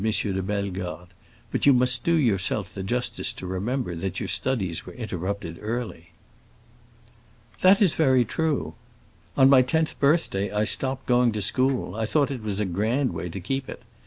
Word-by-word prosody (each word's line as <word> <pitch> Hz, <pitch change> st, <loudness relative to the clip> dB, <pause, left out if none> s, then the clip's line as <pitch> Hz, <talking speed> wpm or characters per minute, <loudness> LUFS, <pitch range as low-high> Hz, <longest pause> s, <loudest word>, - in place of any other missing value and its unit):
de 105 Hz, -3 st, 0 dB
Bellegarde; 95 Hz, -3 st, -4 dB, 0.4 s
"but -, -, 0 dB
you 140 Hz, -, +8 dB
must 125 Hz, -1 st, +2 dB
do 170 Hz, -, +3 dB
yourself 105 Hz, -, 0 dB
the 100 Hz, -, -5 dB
justice 120 Hz, +6 st, -1 dB
to -, -, -9 dB
remember 100 Hz, +4 st, -2 dB
that 95 Hz, +2 st, -4 dB
your -, -, -3 dB
studies 100 Hz, -11 st, -2 dB
were -, -, -10 dB
interrupted 95 Hz, -5 st, -5 dB
early." 110 Hz, -7 st, -4 dB, 1.5 s
"That 195 Hz, +3 st, +6 dB
is 185 Hz, -, +3 dB
very 130 Hz, -5 st, +3 dB
true; 150 Hz, -, -1 dB, 0.6 s
on 130 Hz, -, +7 dB
my 135 Hz, -1 st, +7 dB
tenth 160 Hz, +5 st, 0 dB
birthday 140 Hz, -, +1 dB
I 105 Hz, 0 st, +1 dB
stopped 130 Hz, +4 st, 0 dB
going 125 Hz, -1 st, +3 dB
to 105 Hz, -, -3 dB
school. 130 Hz, 0 st, 0 dB
I 110 Hz, +1 st, -2 dB
thought 145 Hz, +2 st, +1 dB
it 130 Hz, -4 st, -4 dB
was 105 Hz, -2 st, -3 dB
a 105 Hz, -, +1 dB
grand 110 Hz, +9 st, 0 dB
way 90 Hz, -, -4 dB
to 95 Hz, -, -6 dB
keep 130 Hz, +8 st, -3 dB
it. -, -, -8 dB
110 Hz, 170 wpm, -25 LUFS, 95-130 Hz, 1.5 s, you